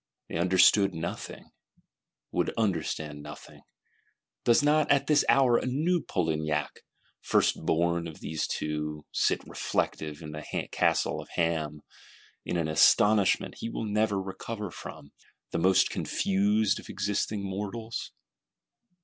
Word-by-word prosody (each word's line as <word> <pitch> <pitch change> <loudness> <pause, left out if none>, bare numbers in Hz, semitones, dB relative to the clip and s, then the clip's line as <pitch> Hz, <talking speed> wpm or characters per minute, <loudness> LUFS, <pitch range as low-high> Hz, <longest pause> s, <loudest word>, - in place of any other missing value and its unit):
They - - -3
understood 95 +2 +4
nothing; 80 +1 -6 0.8
would - - 0
understand 80 -7 -2
nothing. 75 +1 -11 0.8
Does 120 +4 +4
not, 150 0 +3
at 140 -1 +3
this 150 -1 +4
hour, 130 -3 +5
a - - -4
new 160 +7 +1
Polignac, 75 -4 -2 0.4
first - - +1
born 85 +1 +1
of 80 - -10
these 80 -2 -3
Two, 75 0 -3
sit - - +1
reflective 75 0 -3
in 75 - -7
the 75 0 -6 0.3
Castle - - +1
of - - -14
Ham; 80 -3 -1 0.6
in 90 - -2
an 80 -2 0
astonishment 100 +6 +4
he 115 - -4
will 115 - -4
never 105 -1 +1
recover 100 +1 -6
from; 70 - -10 0.4
the - - -1
most 95 +2 +4
confused 100 +2 +1
of - - -13
existing 100 +1 -2
mortals? 105 +4 -5
95 Hz, 125 wpm, -28 LUFS, 80-110 Hz, 0.8 s, hour